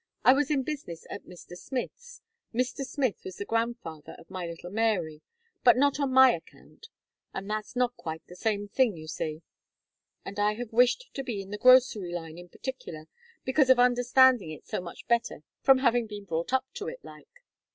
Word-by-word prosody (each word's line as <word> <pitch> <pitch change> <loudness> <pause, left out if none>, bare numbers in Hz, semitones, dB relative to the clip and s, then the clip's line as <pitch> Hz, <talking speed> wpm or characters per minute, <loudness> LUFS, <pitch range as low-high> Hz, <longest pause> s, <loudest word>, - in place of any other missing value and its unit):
I 255 - +8
was 280 0 +1
in 280 -3 +1
business 260 - -6
at - - -7
Mr. 175 0 -12
Smith's, 480 - -6 0.3
Mr. 250 +2 -1
Smith 265 -4 -2
was 185 - -7
the 200 - -5
grandfather 225 -10 -3
of - - -17
my 185 -2 -4
little 170 +1 -8
Mary, 195 -8 0 0.4
but 250 0 +7
not 285 +2 +2
on 280 -2 0
my 260 -1 +7
account; 315 - -12 0.5
and 195 +1 -5
that's 215 +3 -4
not 245 -1 +1
quite 160 0 -6
the 180 - -13
same 205 +1 -1
thing, 225 -3 +1
you 155 0 -10
see. 155 +1 -4 0.8
And 200 +1 -6
I 210 +1 +2
have 235 -1 -7
wished 250 - +3
to 270 - -4
be 235 -6 -4
in 195 - -13
the 210 - -5
grocery 250 -7 +5
line, 165 -1 -6
in 175 0 -12
particular, 170 - -7 0.4
because 260 0 +3
of 260 - +7
understanding 245 -3 +4
it 155 - -9
so - - -3
much 170 -1 -10
better, 235 -9 0 0.2
from 270 -1 +6
having 240 -3 +2
been 205 -1 -8
brought 165 +3 -3
up 260 0 +2
to 415 - -5
it, - - -8
like. - - -15
230 Hz, 195 wpm, -28 LUFS, 180-260 Hz, 0.8 s, I